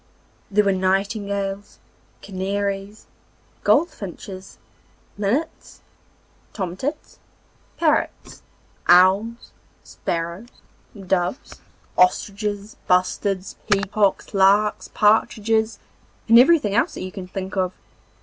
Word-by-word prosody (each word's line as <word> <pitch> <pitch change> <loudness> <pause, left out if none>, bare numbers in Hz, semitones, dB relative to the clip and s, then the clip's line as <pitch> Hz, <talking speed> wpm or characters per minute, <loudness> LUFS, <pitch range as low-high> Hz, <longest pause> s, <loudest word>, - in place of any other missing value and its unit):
There 210 +1 +3
were 200 - +2
nightingales, 195 +1 -2 0.5
canaries, 200 +1 -3 0.6
goldfinches, 200 - -1 0.6
linnets, 225 +11 -3 0.7
tomtits, 205 - -5 0.6
parrots, 315 -2 -1 0.5
owls, 195 +6 +4 0.3
sparrows, 170 +6 -4 0.5
doves, 185 +4 -2 0.4
ostriches, 205 +3 0
bustards, 185 +1 0
peacocks, 200 0 +1
larks, 200 +2 +3
partridges, 220 +1 +2 0.5
and 230 +1 +8
everything 260 -7 +4
else 235 - +1
that - - -6
you 185 - -6
can 190 -2 -8
think 190 0 -6
of. 185 -2 0
200 Hz, 80 wpm, -22 LUFS, 190-215 Hz, 0.7 s, and